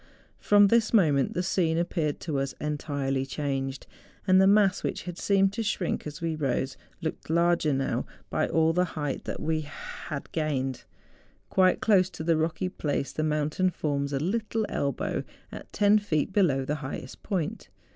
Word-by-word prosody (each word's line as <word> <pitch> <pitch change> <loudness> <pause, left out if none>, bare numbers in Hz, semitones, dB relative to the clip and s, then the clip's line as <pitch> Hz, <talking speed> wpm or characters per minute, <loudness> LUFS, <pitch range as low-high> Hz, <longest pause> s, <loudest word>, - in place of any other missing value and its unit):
From 205 -1 +5
this 230 0 +3
moment 150 -9 +3
the 180 - 0
scene 165 -3 +1
appeared 165 -3 -1
to 150 -5 -2
us 135 0 -3
entirely 140 -3 -2
changed, 135 -1 -3 0.4
and 185 -1 +5
the 190 - +6
mass 200 -2 +4
which - - -3
had 175 -1 -7
seemed 195 -1 +3
to 225 - -2
shrink 200 -7 -1
as 150 +2 -8
we 165 -1 -1
rose, 135 -2 -1 0.3
looked 160 - -4
larger 170 -1 +3
now 135 -1 -1 0.2
by - - +1
all 160 0 +2
the 180 +2 +3
height 145 -3 -3
we 155 0 0
had 150 -1 -7
gained. 135 -5 -2 0.7
Quite 185 -1 +3
close 190 -4 +4
to - - -4
the 165 0 +3
rocky 160 +3 -1
place 145 -6 -2
the - - -2
mountain 155 +4 +1
forms 145 -4 -2
a 140 - 0
little 220 +6 -1
elbow 140 -2 -1 0.3
at - - -10
ten 210 +1 +4
feet 190 -3 -1
below 145 -10 +2
the 150 +3 -1
highest 135 -1 -7
point. 180 -7 -3
160 Hz, 165 wpm, -27 LUFS, 145-185 Hz, 0.7 s, the